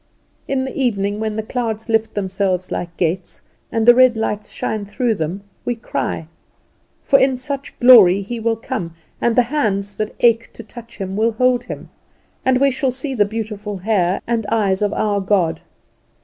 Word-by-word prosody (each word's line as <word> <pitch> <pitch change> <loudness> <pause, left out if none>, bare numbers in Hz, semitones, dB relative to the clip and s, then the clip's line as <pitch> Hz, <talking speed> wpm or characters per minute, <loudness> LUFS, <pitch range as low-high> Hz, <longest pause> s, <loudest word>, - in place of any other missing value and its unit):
In 265 -1 0
the 265 - -6
evening, 205 -6 0
when 220 -1 -2
the 220 - -2
clouds 220 -2 -3
lift 225 -1 0
themselves 190 -2 -1
like 175 -1 -4
gates, 175 +1 -2 0.3
and 225 -1 0
the 240 - +10
red 255 -2 +5
lights 210 -1 -2
shine 215 -1 -3
through 225 +4 -1
them, 180 +2 -4 0.2
we 245 - -1
cry; 225 -7 -3 0.8
for 275 - +4
in 265 -1 +2
such 275 +2 -6
glory 205 -7 +7
He 235 +4 -5
will 225 0 0
come, 175 -6 -5 0.3
and 235 -1 +2
the 250 - +5
hands 200 -8 0
that 215 0 -3
ache 230 -1 +3
to 230 - -10
touch 235 +1 -12
Him 195 -2 -4
will 225 +2 +1
hold 250 +1 +2
him, - - -8 0.5
and 260 -1 +3
we 275 0 +4
shall 265 +1 0
see 265 +2 -3
the 210 -5 +3
beautiful 210 -1 -5
hair 190 -2 0
and 230 -3 -1
eyes 200 -4 +1
of 205 -1 +1
our 210 -1 0
God. 180 -5 +1
220 Hz, 180 wpm, -19 LUFS, 200-245 Hz, 0.8 s, the